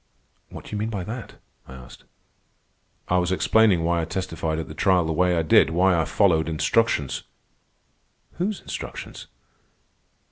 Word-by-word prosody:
"What - - -10
do - - -12
you 105 - -3
mean 110 +2 -2
by 100 -5 -4
that?" 115 +5 -7 0.3
I 65 - -11
asked. 60 -1 -14 1.0
"I 90 - +2
was 90 0 -1
explaining 100 -2 +3
why 85 0 +1
I - - -2
testified 85 -3 -3
at 80 -3 -4
the - - -9
trial 90 -3 +2
the 80 - -1
way 90 +2 +2
I 80 - +1
did—why 90 +4 +4
I 80 -1 +1
followed 80 -6 +2
instructions." 80 - 0 1.2
"Whose 195 +3 -2
instructions?" - - -8
90 Hz, 150 wpm, -24 LUFS, 80-100 Hz, 1.2 s, did—why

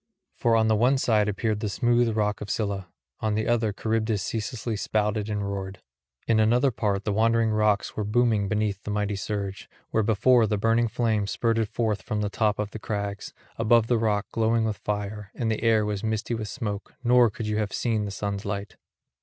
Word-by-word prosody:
For 115 -1 +2
on 110 0 +3
one 120 +5 +3
side 110 -5 +2
appeared 105 +1 -1
the 105 - -2
smooth 120 +1 +2
rock 105 -1 0
of 105 - -6
Scylla; 100 -4 -2 0.3
on 110 -1 0
the 110 0 -1
other 115 -2 +2
Charybdis 110 -1 -1
ceaselessly 115 0 -3
spouted 105 0 -1
and 105 -1 -2
roared; 95 -1 -5 0.5
in 115 -1 +3
another 120 +5 +3
part 105 -3 -1
the 105 - 0
Wandering 115 +1 +2
rocks 105 -1 +1
were 105 - -1
booming 110 -1 +2
beneath 105 -2 -1
the - - -7
mighty 105 0 -1
surge, 100 0 -4 0.2
where 110 - +2
before 110 +3 +4
the 105 0 0
burning 115 +3 +2
flame 110 -3 0
spurted 115 0 0
forth 110 -4 -1
from 105 -1 -3
the 105 -1 -2
top 105 +1 +1
of 105 0 -3
the 110 - -7
crags, 100 -1 -4 0.3
above 115 0 +4
the 120 0 +1
rock 105 -2 +1
glowing 115 0 +1
with 110 -2 -2
fire, 105 0 -4
and 115 -3 -1
the 110 - -2
air 110 -2 +3
was 105 -1 -3
misty 110 +1 -1
with 110 -2 -3
smoke, 105 -4 -5
nor 120 -1 +5
could 105 +2 -6
you 105 0 -1
have 105 -2 -1
seen 110 -3 0
the - - -4
sun's 100 0 -3
light. 100 0 -5
110 Hz, 200 wpm, -26 LUFS, 105-115 Hz, 0.5 s, nor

